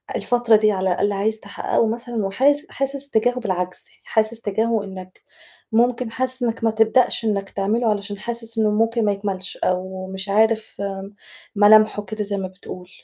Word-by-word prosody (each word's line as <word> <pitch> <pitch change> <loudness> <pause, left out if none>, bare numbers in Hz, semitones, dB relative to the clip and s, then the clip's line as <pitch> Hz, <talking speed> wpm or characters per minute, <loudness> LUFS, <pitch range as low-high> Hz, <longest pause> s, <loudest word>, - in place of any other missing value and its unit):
الفترة 240 -2 +3
دي 215 0 +4
على 190 -1 0
الأقل 205 +3 +1
عايز 215 +3 -1
تحقّقه 200 +2 -1
مثلًا، 230 -1 -3
وحاس 280 +9 +2
حاسس 275 0 -3
تجاهه 245 +1 +1
بالعجز، 180 -5 -3
يعني - - -32
حاسس 220 +1 0
تجاهه 220 +1 0
إنّك 185 -2 -10 0.5
ممكن 240 +1 +1
حاسس 255 +1 -2
إنّك 230 -1 -2
ما 225 - +3
تبدأش 225 +2 +2
إنّك 200 -2 -1
تعمله 220 +4 0
علشان 205 -1 -2
حاسس 230 +1 -4
إنه 215 -1 +3
ممكن 225 +1 +1
ما 205 - +3
يكملش، 195 -1 -4
أو 185 +1 -2
مش 190 +1 -4
عارف 220 +1 +1 0.7
ملامحه 210 0 +5
كده 210 +2 -4
زي 200 0 -3
ما 190 -1 -3
بتقول؟ 185 -1 -11
215 Hz, 165 wpm, -21 LUFS, 195-230 Hz, 0.7 s, ملامحه